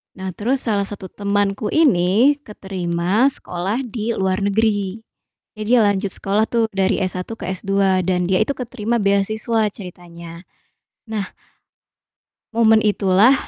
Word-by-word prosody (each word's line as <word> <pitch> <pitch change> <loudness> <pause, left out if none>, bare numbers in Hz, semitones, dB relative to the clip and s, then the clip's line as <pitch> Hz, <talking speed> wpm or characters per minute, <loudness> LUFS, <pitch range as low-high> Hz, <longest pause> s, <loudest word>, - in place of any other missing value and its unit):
Nah, 190 0 -5
terus 250 +8 -1
salah 200 -4 0
satu 190 -2 -8
temanku 205 0 -1
ini 255 - +3
keterima 190 -1 -1
sekolah 200 -1 -2
di 230 -1 -3
luar 190 0 0
negeri, 205 0 0 0.6
eh, - - -2
dia 245 -1 +5
lanjut 200 0 +1
sekolah 205 +3 0
tuh 230 -1 +1
dari 195 +1 +1
S1 185 0 -3
ke - - -8
S2 195 0 +1
dan 180 -1 +1
dia 185 - +3
itu 280 - -2
keterima 240 -2 -3
beasiswa 215 +3 +1
ceritanya. 170 -3 -10 0.6
Nah 210 -3 -4 1.2
momen 220 -1 +4
itulah 205 +3 +4
200 Hz, 130 wpm, -20 LUFS, 190-225 Hz, 1.2 s, dia